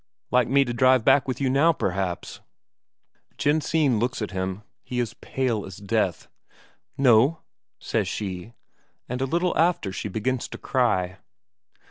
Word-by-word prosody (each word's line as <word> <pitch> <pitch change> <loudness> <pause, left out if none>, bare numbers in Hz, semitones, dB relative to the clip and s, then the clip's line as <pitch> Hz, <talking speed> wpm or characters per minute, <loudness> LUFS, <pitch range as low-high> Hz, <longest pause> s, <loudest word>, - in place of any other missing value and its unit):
"Like 125 -1 +3
me 140 +1 +4
to 120 - -3
drive 130 -1 +4
back 140 - +4
with 130 -2 -3
you 135 - +1
now, 140 +6 +4
perhaps?" 95 - -3 1.0
Jensine 150 -4 +2
looks 120 +2 -1
at 105 - -4
him; 95 +2 -3 0.2
he 125 - -4
is 120 -3 -2
pale 120 -6 -2
as 95 - -9
death. 100 -3 -1 0.7
"No," 135 +3 +4 0.4
says - - -1
she. 95 +1 -5 0.5
And 125 +1 -4
a - - +2
little 175 +6 0
after 165 - +2
she 95 - -4
begins 115 +5 -2
to - - -8
cry. 100 -8 0
125 Hz, 145 wpm, -25 LUFS, 100-135 Hz, 1.0 s, me